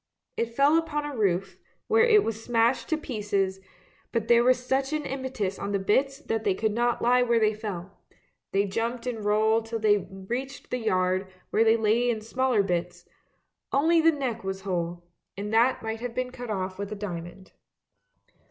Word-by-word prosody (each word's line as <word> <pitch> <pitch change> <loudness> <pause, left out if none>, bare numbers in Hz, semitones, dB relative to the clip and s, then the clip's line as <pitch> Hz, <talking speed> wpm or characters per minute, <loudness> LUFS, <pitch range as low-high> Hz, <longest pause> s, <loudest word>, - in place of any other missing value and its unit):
It 230 0 -3
fell 285 +4 +5
upon 300 -2 -3
a 295 -2 -5
roof, 195 -3 0 0.3
where 450 +1 +4
it 435 -3 +5
was 225 0 -4
smashed 235 +2 +1
to 315 - +1
pieces, 205 -9 -2 0.5
but 230 -2 -1
there 235 0 +6
was 255 +1 +4
such 270 +2 0
an 305 -1 -2
impetus 260 -9 -3
on 200 - -3
the - - +3
bits 265 +8 +1
that 225 -7 -3
they 195 -3 +1
could 220 +2 0
not 240 +2 0
lie 250 +1 +4
where 235 -1 +3
they 215 -1 +3
fell; 200 -3 -7 0.5
they 200 +1 +2
jumped 230 +4 -3
and 230 -4 -3
rolled 220 +2 +2
till 230 0 -3
they 210 -2 +2
reached 240 +8 -6
the 250 - -1
yard, 185 -3 +1 0.2
where 220 - +4
they 225 0 +4
lay 225 +3 +2
in 225 -2 0
still 220 - -14
smaller 255 -5 +2
bits; 175 -1 -3 0.6
only 325 +4 +4
the 330 +1 +5
neck 260 -8 -3
was 190 0 -4
whole, 175 -2 -3 0.3
and 205 +2 -4
that 235 +3 +3
might 220 0 -3
have 240 0 -5
been 255 0 -2
cut 245 -2 -8
off 190 -2 -3
with 200 +1 -4
a - - -3
diamond. 185 -2 -7
225 Hz, 190 wpm, -27 LUFS, 200-250 Hz, 0.6 s, there